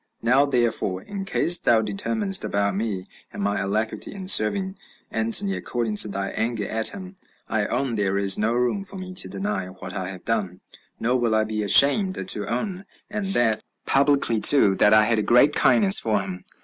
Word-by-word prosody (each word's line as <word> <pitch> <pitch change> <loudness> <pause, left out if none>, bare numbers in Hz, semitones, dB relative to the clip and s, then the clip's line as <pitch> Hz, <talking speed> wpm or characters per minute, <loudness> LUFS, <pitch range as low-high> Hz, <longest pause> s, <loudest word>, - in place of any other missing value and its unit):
Now, 130 +5 +2
therefore, 120 -7 -1
in 195 -1 -7
case 175 -2 +4
thou 115 -1 +2
determinest 195 - -1
about 100 -1 -2
me, 100 -3 -4 0.2
and - - -6
my 100 0 -1
alacrity 105 +3 -3
in 195 -2 -9
serving 190 - +2 0.4
Antony, 115 - +2
according 115 -3 -4
to 105 - +7
thy 100 -1 -4
anger 110 -3 -3
at 110 0 0
him, 190 -1 -4 0.3
I 105 -2 -1
own 135 -3 -2
there 100 -3 -1
is 100 -1 +3
no 110 +2 -1
room 125 +11 -1
for 195 0 -5
me 185 -1 -8
to 185 - 0
deny 200 - -3
what 95 0 -10
I 95 -2 -4
have 95 -2 -9
done, 95 -5 -2 0.4
nor 125 +3 0
will 115 -2 0
I 110 - +2
be 110 0 -4
ashamed 145 - +3
to 100 -2 0
own, 180 - -4 0.3
and 210 -2 -3
that 115 -2 +1 0.2
publicly 140 -5 +1
too, 105 -6 +4
that 105 - +4
I 110 0 +5
had 115 0 0
a - - 0
great 125 +7 +3
kindness 200 +3 +4
for 110 -2 -1
him. 95 -2 -8
115 Hz, 190 wpm, -22 LUFS, 105-170 Hz, 0.4 s, to